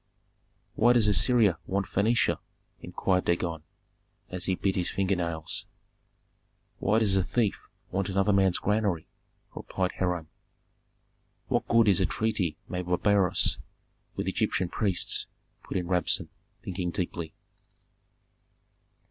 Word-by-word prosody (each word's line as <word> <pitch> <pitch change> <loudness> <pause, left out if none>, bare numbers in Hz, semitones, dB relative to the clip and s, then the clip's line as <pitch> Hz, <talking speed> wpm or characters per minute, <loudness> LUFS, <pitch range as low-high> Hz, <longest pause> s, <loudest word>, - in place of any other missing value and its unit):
"Why 120 +2 +4
does 120 -3 +4
Assyria 105 0 +3
want 100 +1 0
Phœnicia?" 110 +6 +1 0.4
inquired 90 +1 -1
Dagon, 85 -2 -1 0.7
as 90 0 -3
he 95 - +1
bit 95 +1 0
his 90 -2 0
finger 100 0 0
nails. 85 -3 -3 1.1
"Why 110 - +2
does 105 -4 +2
a 95 - +3
thief 110 +1 -1 0.2
want 95 +1 -1
another 95 +2 +2
man's 95 -2 +3
granary?" 105 -6 0 0.5
replied 95 -1 -2
Hiram. 90 -3 -1 1.2
"What - - 0
good 115 -1 +4
is 95 -2 +4
a 95 - +3
treaty 105 -8 -1
made 90 0 -4
by 90 - +2
Beroes 95 0 +3 0.6
with - - -3
Egyptian 90 -1 0
priests?" 100 -3 0 0.4
put - - -4
in 90 - -2
Rabsun, 90 -1 0 0.3
thinking 90 -1 -3
deeply. 85 -2 -4
95 Hz, 125 wpm, -28 LUFS, 90-100 Hz, 1.2 s, Why